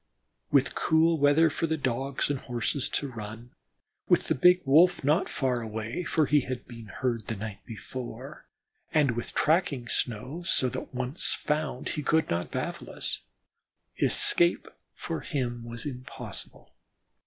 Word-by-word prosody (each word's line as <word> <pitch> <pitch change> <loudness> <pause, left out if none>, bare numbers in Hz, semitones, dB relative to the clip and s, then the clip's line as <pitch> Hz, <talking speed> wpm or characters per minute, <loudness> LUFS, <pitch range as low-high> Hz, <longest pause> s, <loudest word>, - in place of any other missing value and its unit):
With 140 -2 +3
cool 160 0 +3
weather 145 +3 +5
for 165 +2 -1
the 160 0 0
Dogs 135 +1 -1
and 140 - -2
Horses 125 +2 -2
to 145 - -1
run; 110 +1 -8 0.6
with - - +3
the - - +4
big 180 +6 +5
Wolf 170 +6 +5
not 150 +6 +2
far 125 -3 0
away, 110 +7 -4
for 155 -2 +2
he 150 +2 +4
had 130 -2 -5
been 115 -2 -10
heard 115 0 -2
the 110 - -2
night 105 0 -6
before; 120 +3 -8 0.4
and 150 -4 +3
with 120 +1 -5
tracking 150 -6 +1
snow, 125 +9 -2
so 135 -6 +2
that 130 +1 -6
once 130 +4 +2
found 150 -4 -2
he 150 - -2
could 160 +2 +1
not 85 +1 -1
baffle - - -4
us, - - 0 0.8
escape 170 0 +3 0.3
for 165 - -4
him 120 -7 -3
was 115 +2 -7
impossible. 130 -3 -6
130 Hz, 150 wpm, -28 LUFS, 120-155 Hz, 0.8 s, weather